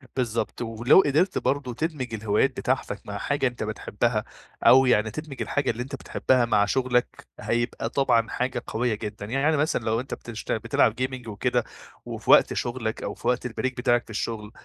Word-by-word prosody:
بالضبط 115 Hz, -3 st, -2 dB
ولو 120 Hz, +8 st, +4 dB
قدرت 155 Hz, +7 st, +2 dB
برضو 135 Hz, -3 st, -1 dB
تدمج 130 Hz, -4 st, -3 dB
الهوايات 110 Hz, +4 st, +2 dB
بتاعتك -, -, -1 dB
مع -, -, -5 dB
حاجة 140 Hz, -1 st, 0 dB
أنت 120 Hz, -2 st, -4 dB
بتحبها، 110 Hz, +1 st, -1 dB, 0.4 s
أو 130 Hz, +1 st, +8 dB
يعني 110 Hz, -3 st, +3 dB
تدمج 155 Hz, -1 st, -7 dB
الحاجة 145 Hz, -, -1 dB
اللي 120 Hz, +2 st, -4 dB
أنت 135 Hz, +2 st, -6 dB
بتحبها 130 Hz, -2 st, +1 dB
مع 105 Hz, -3 st, +3 dB
شغلك، 125 Hz, +2 st, 0 dB
هيبقى 120 Hz, -1 st, -1 dB
طبعًا 120 Hz, -4 st, +2 dB
حاجة 125 Hz, -1 st, -2 dB
قويّة 115 Hz, 0 st, 0 dB
جدًا، 105 Hz, -1 st, -6 dB
يعني 135 Hz, +7 st, +1 dB
مثلًا 145 Hz, -5 st, 0 dB
لو 115 Hz, +1 st, +1 dB
أنت 130 Hz, -, -6 dB
بتشت 115 Hz, -2 st, -6 dB
بتلعب -, -, +2 dB
gaming 130 Hz, -2 st, -3 dB
وكده 105 Hz, -2 st, 0 dB, 0.4 s
وفي -, -, -2 dB
وقت -, -, +6 dB
شغلك 120 Hz, -2 st, -3 dB
أو -, -, -3 dB
في -, -, -7 dB
وقت 125 Hz, 0 st, +1 dB
البريك 125 Hz, +2 st, -3 dB
بتاعك 120 Hz, -1 st, +2 dB
في -, -, -25 dB
الشغل، 110 Hz, -1 st, -4 dB
120 Hz, 175 wpm, -25 LUFS, 110-130 Hz, 0.4 s, أو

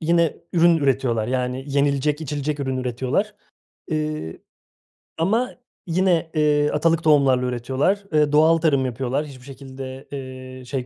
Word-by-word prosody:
yine 170 Hz, -1 st, +2 dB, 0.2 s
ürün 170 Hz, -1 st, +5 dB
üretiyorlar. 130 Hz, -6 st, +1 dB
Yani 125 Hz, +1 st, -2 dB
yenilecek, 140 Hz, +1 st, +1 dB
içilecek 145 Hz, -1 st, -3 dB
ürün 130 Hz, -1 st, -2 dB
üretiyorlar. 130 Hz, -, -1 dB, 0.6 s
Iıı, 155 Hz, -, -3 dB, 0.8 s
ama 225 Hz, +10 st, +1 dB, 0.4 s
yine, 170 Hz, -2 st, +1 dB
ııı, 150 Hz, -1 st, +2 dB
atalık 165 Hz, +2 st, +2 dB
tohumlarla 135 Hz, -5 st, +4 dB
üretiyorlar. 130 Hz, -, 0 dB
Iıı, 150 Hz, -1 st, +3 dB
doğal 160 Hz, +2 st, +5 dB
tarım 150 Hz, -5 st, +2 dB
yapıyorlar. 130 Hz, +3 st, -2 dB
Hiçbir 130 Hz, -4 st, -12 dB
şekilde, 135 Hz, 0 st, -9 dB, 0.5 s
ııı, 130 Hz, -, -12 dB
şey 130 Hz, 0 st, -3 dB
145 Hz, 125 wpm, -22 LUFS, 130-160 Hz, 0.8 s, ürün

